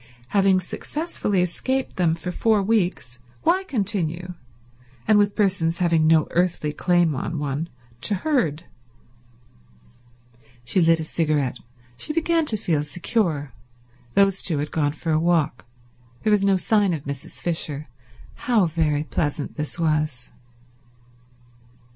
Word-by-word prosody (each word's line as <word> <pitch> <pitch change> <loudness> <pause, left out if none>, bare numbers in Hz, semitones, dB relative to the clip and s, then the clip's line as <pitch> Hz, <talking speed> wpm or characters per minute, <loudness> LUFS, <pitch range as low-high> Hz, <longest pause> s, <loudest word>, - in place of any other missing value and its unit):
Having 195 0 +3
successfully 205 - -2
escaped 260 +9 -2
them 170 -3 +2
for 180 +2 -5
four 215 +2 +2
weeks 180 - 0 0.2
why 375 +2 +3
continue, 185 - -1 0.7
and 215 -1 +5
with 205 0 +2
persons 180 -5 +1
having 165 -3 +2
no 160 -1 +5
earthly 175 -4 0
claim 175 0 +2
on 160 +5 -3
one, 145 +3 -3 0.3
to 205 - 0
herd? 185 - 0 2.0
She 180 +10 +1
lit 165 0 +4
a - - -2
cigarette. 150 -6 -1 0.4
She 305 - -4
began 330 0 +1
to 220 - +2
feel 165 -7 0
secure. 155 - -1 0.6
Those 195 -1 +4
two 165 -5 0
had 145 +1 -3
gone 145 -2 0
for 160 +1 -3
a 155 - +3
walk. 160 -7 +1 0.6
There 215 - +2
was 205 -2 +3
no 195 -1 +4
sign 200 0 +2
of 145 - -7
Mrs. 140 -2 -7
Fisher. 155 -3 -2 0.6
How 220 -6 +4
very 155 -3 0
pleasant 145 -1 -2
this 150 +1 -4
was. 150 -5 -1
170 Hz, 130 wpm, -23 LUFS, 155-200 Hz, 2.0 s, and